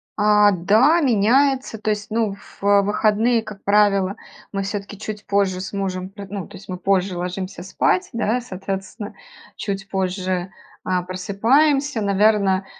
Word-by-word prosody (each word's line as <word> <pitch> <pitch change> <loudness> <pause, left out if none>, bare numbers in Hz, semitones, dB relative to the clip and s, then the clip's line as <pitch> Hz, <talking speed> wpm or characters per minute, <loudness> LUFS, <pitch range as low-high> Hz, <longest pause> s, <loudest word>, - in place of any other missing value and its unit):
А, 210 0 +5
да, 220 - +4
меняется. 260 +1 +2
То 215 0 -3
есть, 210 +1 -4
ну, 215 -2 0 0.3
в 200 0 +5
выходные, 220 +3 +2
как 210 -2 -10
правило, 200 -1 +3 0.4
мы 195 -1 -2
все-таки 200 +1 -5
чуть 210 0 -7
позже 195 -2 +1
с 190 - -7
мужем 185 -1 -3
пр 200 0 -10
ну, 195 -2 -5
то 205 - -13
есть 195 0 -15
мы 180 - -4
позже 190 0 0
ложимся 180 +1 -5
спать, 365 - 0
да, 230 +1 0
соответственно, 195 0 -6 0.4
чуть 195 -1 -4
позже, 185 -1 -2 0.3
а, 185 -1 0
просыпаемся, 235 - +1
наверно, 200 -1 +2
200 Hz, 145 wpm, -21 LUFS, 190-215 Hz, 0.4 s, А